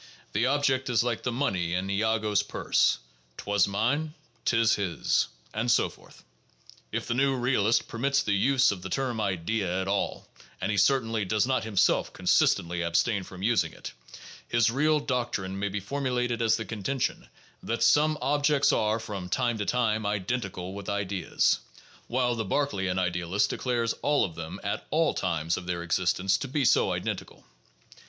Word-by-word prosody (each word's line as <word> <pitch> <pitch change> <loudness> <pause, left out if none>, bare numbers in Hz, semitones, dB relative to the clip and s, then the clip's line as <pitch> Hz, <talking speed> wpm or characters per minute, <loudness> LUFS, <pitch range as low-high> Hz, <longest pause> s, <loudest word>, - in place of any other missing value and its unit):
The 115 +5 +2
object 135 -2 +1
is 120 -2 +3
like 120 -2 -1
the 125 - -2
money 95 -10 -1
in 90 +2 -2
Iago's 105 0 +1
purse; 105 - +1 0.2
" - - -36
'twas 100 0 +1
mine, 140 +10 -1 0.3
'tis 115 -2 +3
his," 90 -6 0 0.3
and 115 +3 -1
so 120 - +3
forth. - - -18 0.7
If - - -2
the - - -1
new 135 +2 +2
real 125 -4 +1
ist 115 - +2
permits 135 +3 0
the 105 - 0
use 135 +6 +3
of 95 -3 -5
the 95 - -6
term 125 +1 -1
"idea" 95 0 -1
at 95 - -3
all 100 0 -2 0.2
— - - -27
and 95 - -1
he 105 - -1
certainly 115 0 +2
does 105 +3 +1
not 130 -3 0
himself 105 -4 +2
consistently 85 +1 +2
abstain 85 +5 +1
from 95 0 -10
using 110 -3 +1
it - - -8 0.3
— - - -16
his 115 0 +4
real 150 +4 +2
doctrine 115 -8 -2
may 100 +1 -1
be 100 +2 -3
formulated 125 +1 -2
as 115 -1 +3
the 115 - -5
contention 115 +5 -3 0.3
that 115 0 -2
some 150 +6 +4
objects 145 +1 +3
are 110 +1 +1
from 100 -5 -6
time 120 +1 0
to 105 - -1
time 110 -3 +1
identical 100 -3 -3
with 100 0 -7
ideas; 100 -3 0 0.5
while 125 0 +1
the 115 -1 -2
Berkeleian 95 -6 -1
idealist 90 +1 0
de - - -3
clares 120 -3 0
all 145 0 +2
of 85 - -7
them 80 0 -7
at - - -3
all - - +2
times 85 -2 -1
of 90 - -7
their 85 -1 -2
existence 90 +2 +1
to - - -4
be 140 +1 0
so - - +4
identical. - - -5
110 Hz, 175 wpm, -27 LUFS, 95-125 Hz, 0.7 s, his